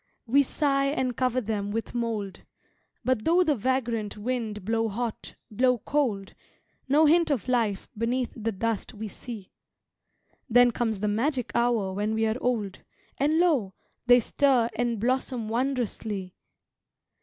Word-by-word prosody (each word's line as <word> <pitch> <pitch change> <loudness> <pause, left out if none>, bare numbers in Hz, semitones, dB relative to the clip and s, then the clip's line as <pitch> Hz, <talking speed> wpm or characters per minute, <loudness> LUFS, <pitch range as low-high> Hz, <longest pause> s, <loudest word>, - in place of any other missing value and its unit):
We 265 +4 +4
sigh 275 0 +1
and 260 -3 -1
cover 255 +1 +1
them 205 -2 -2
with 225 +2 -3
mould, 225 -5 -3 0.6
But 255 -4 +1
though 345 +6 +4
the 315 -4 +2
vagrant 230 -3 -1
wind 215 -3 -3
blow 225 +1 +1
hot, 230 +2 -4 0.2
blow 250 +3 +3
cold, 230 -7 -1 0.6
No 300 +3 +5
hint 335 +2 +4
of 270 -4 -1
life 225 -6 0
beneath 240 +3 -1
the 225 -1 -2
dust 225 +1 -3
we 215 +1 -5
see; 215 -2 -9 1.0
Then 245 +1 +6
comes 225 -4 -2
the 210 - +1
magic 250 +4 0
hour 235 -5 +1
when 210 +3 -1
we 220 0 +1
are 220 +3 -1
old, 215 -6 -1 0.4
And 295 +3 +2
lo! 285 - +2 0.3
they 245 0 +8
stir 245 -1 +2
and 235 -2 -1
blossom 250 0 -1
wondrously. 225 -6 -2
235 Hz, 145 wpm, -27 LUFS, 215-255 Hz, 1.0 s, they